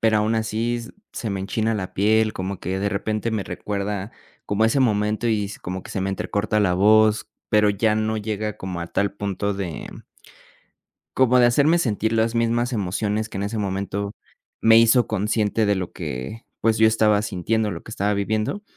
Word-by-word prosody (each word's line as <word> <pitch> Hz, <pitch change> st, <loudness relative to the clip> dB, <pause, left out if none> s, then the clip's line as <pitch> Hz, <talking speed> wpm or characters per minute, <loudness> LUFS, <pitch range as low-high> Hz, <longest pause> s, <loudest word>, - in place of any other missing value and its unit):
Pero 110 Hz, -1 st, +3 dB
aún 110 Hz, +2 st, +1 dB
así 115 Hz, +2 st, -1 dB, 0.3 s
se 115 Hz, -, -4 dB
me 95 Hz, -1 st, -3 dB
enchina 110 Hz, +3 st, -1 dB
la 95 Hz, -3 st, -4 dB
piel, 110 Hz, +2 st, +2 dB
como 95 Hz, 0 st, -5 dB
que 95 Hz, +2 st, -3 dB
de 100 Hz, -, 0 dB
repente 110 Hz, +2 st, -2 dB
me 105 Hz, -3 st, -1 dB
recuerda 100 Hz, +1 st, -4 dB, 0.3 s
como 105 Hz, +2 st, +1 dB
ese 115 Hz, +5 st, +2 dB
momento, 105 Hz, -2 st, +1 dB
y 105 Hz, -3 st, +1 dB
es 100 Hz, -, -9 dB
como 90 Hz, +1 st, -5 dB
que -, -, -11 dB
se 95 Hz, -, -3 dB
me 95 Hz, +1 st, -1 dB
entrecorta 105 Hz, +2 st, -1 dB
la 90 Hz, -3 st, +2 dB
voz, 110 Hz, +2 st, +4 dB, 0.2 s
pero 105 Hz, -1 st, +4 dB
ya 105 Hz, +2 st, +1 dB
no 110 Hz, 0 st, 0 dB
llega 105 Hz, 0 st, -3 dB
como 95 Hz, -2 st, -5 dB
a 85 Hz, -, -4 dB
tal 100 Hz, +3 st, 0 dB
punto 100 Hz, 0 st, -2 dB
de 95 Hz, -5 st, -5 dB, 1.3 s
como 125 Hz, -1 st, +4 dB
de 120 Hz, -, +6 dB
hacerme 150 Hz, +8 st, +4 dB
sentir 110 Hz, -6 st, 0 dB
las 115 Hz, +1 st, +1 dB
mismas 120 Hz, +2 st, +1 dB
emociones 105 Hz, +1 st, -1 dB
que 95 Hz, -, -6 dB
en 100 Hz, -, -2 dB
ese 105 Hz, +2 st, -3 dB
momento 100 Hz, +1 st, -3 dB, 0.5 s
me 115 Hz, 0 st, +7 dB
hizo 115 Hz, +1 st, +5 dB
consciente 105 Hz, +1 st, 0 dB
de 100 Hz, -, +3 dB
lo 90 Hz, -2 st, -4 dB
que, 65 Hz, -, -6 dB, 0.2 s
pues, 115 Hz, -1 st, +2 dB
yo 110 Hz, -, +6 dB
estaba 105 Hz, -1 st, +3 dB
sintiendo 105 Hz, +3 st, -1 dB
lo 85 Hz, -4 st, -6 dB
que -, -, -12 dB
estaba 105 Hz, -1 st, 0 dB
viviendo. 110 Hz, -, -1 dB
105 Hz, 190 wpm, -23 LUFS, 100-110 Hz, 1.3 s, me